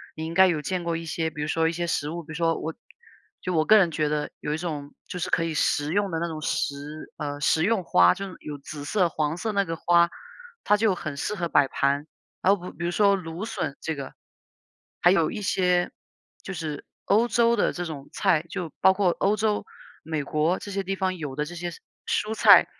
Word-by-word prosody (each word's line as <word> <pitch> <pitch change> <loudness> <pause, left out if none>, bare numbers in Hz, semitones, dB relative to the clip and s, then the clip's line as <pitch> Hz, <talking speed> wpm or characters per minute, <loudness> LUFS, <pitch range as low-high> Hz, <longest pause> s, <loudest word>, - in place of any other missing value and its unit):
你 160 - -4
应 165 - -5
该 190 +2 +7
有 165 -4 0
见 180 +4 -2
过 170 -1 -1
一 165 - -6
些， 160 0 -1
比 150 - -7
如 150 - -1
说 160 +1 +2
一 - - +1
些 170 +1 -2
食 150 -2 -1
物， 170 +2 -5
比 - - -23
如 - - -6
说 165 0 +1
我 160 - -4 0.7
就 185 - -2
我 155 -2 +2
个 215 - +7
人 180 -5 +4
觉 155 -1 0
得 150 0 -1
有 150 - -2
一 - - -1
种 150 -4 -5
就 180 - -5
是 175 - -2
可 165 - +2
以 165 -1 -2
食 145 -1 +1
用 200 0 +1
的 165 - -1
那 170 - -1
种 160 -2 -6
食， 145 +1 -3
呃 145 -1 -4
食 160 +2 +3
用 210 0 +2
花， 90 - +5
就 195 - -5
是 185 - -10
有 150 -1 -7
紫 145 +1 -8
色、 180 +2 +2
黄 155 -1 -1
色 220 +4 -2
那 200 -1 +1
个 165 -2 -3
花， 170 +1 +4 0.5
它 210 - +4
就 210 -3 +2
很 155 -4 -5
适 210 +8 -2
合 175 -4 -2
摆 145 -3 +4
盘。 140 +2 0 0.3
然 195 +2 +5
后 180 -2 -8
比 - - -22
比 170 - -2
如 - - +1
说 200 +1 +4
芦 175 +1 -5
笋 140 -10 -3
这 160 - -2
个， 140 -2 -7 0.9
还 175 - +6
有 165 -4 +3
一 215 - -5
些 180 -2 +2 0.5
就 195 - -5
是 155 -4 -5 0.2
欧 220 +4 +4
洲 235 -1 +3
的 210 - +1
这 175 - -4
种 145 -4 -7
菜， 180 -6 +2
就 175 -3 -4
包 190 - +7
括 190 -1 +2
欧 200 +2 +3
洲， 215 0 0 0.4
美 155 -2 -2
国 155 +5 +1
这 205 - -8
些 195 0 -2
地 195 +1 -2
方 185 -1 -1
有 145 -5 -5
的 150 - 0
这 170 - -8
些 175 +1 -3 0.4
蔬 215 +1 0
菜。 - - +8
170 Hz, 260 characters per minute, -26 LUFS, 155-190 Hz, 0.9 s, 菜